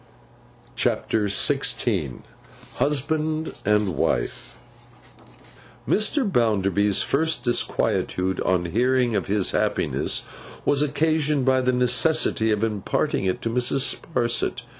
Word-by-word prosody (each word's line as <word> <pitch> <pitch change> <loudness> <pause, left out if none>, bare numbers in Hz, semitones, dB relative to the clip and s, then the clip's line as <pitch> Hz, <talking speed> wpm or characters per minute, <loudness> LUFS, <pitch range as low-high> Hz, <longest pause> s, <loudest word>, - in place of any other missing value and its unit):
CHAPTER 110 -2 0
XVI 100 - 0 0.6
HUSBAND 155 +3 -1
AND 105 -1 +2
WIFE - - -2 1.3
MR. 215 +1 +1
BOUNDERBY'S 100 - +2
first 155 -2 0
disquietude 95 -6 0
on 90 -2 0
hearing 120 +5 +1
of 100 - -1
his 100 -1 +1
happiness, - - 0 0.4
was 145 0 +2
occasioned 150 -1 0
by 130 -1 +3
the 125 0 +1
necessity 125 -1 +2
of 105 0 0
imparting 105 -2 -1
it 95 - -2
to 115 - -2
Mrs. 125 +3 0
Sparsit. 120 -7 -1
120 Hz, 100 wpm, -23 LUFS, 105-145 Hz, 1.3 s, by